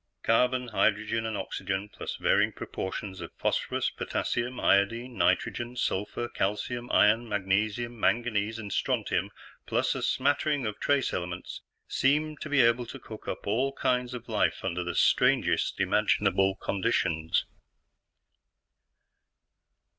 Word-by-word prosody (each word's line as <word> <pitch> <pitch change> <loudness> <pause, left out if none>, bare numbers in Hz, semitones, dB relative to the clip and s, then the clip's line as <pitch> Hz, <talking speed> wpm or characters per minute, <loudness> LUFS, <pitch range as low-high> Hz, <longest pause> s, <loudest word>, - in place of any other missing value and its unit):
Carbon, 125 +2 +2
hydrogen, 110 +1 +1
and 110 -2 -3
oxygen, 95 +1 -3
plus - - -6
varying - - +2
proportions 95 0 -5
of 85 - -7
phosphorus, - - 0
potassium, 125 +1 -2
iodine, 115 +5 +2
nitrogen, 120 +2 0
sulfur, 115 0 -2
calcium, 120 +4 -2
iron, 110 +3 +4
magnesium, 105 +4 -1
manganese, 110 -2 +1
and 105 -3 -6
strontium, - - 0 0.4
plus - - +1
a - - -4
smattering 145 -3 +1
of 105 -1 -4
trace 140 -2 +1
elements, 90 0 -5 0.3
seem 150 +3 +1
to 155 - -7
be 145 -2 +4
able 115 0 +3
to - - -7
cook 110 -1 -11
up - - -4
all 130 +7 0
kinds 125 -1 0
of 120 -1 -8
life 110 -4 0
under 90 -1 -1
the 90 -1 -4
strangest - - +3
imaginable 95 0 +2
conditions. 80 -5 0
110 Hz, 125 wpm, -28 LUFS, 100-125 Hz, 0.4 s, iron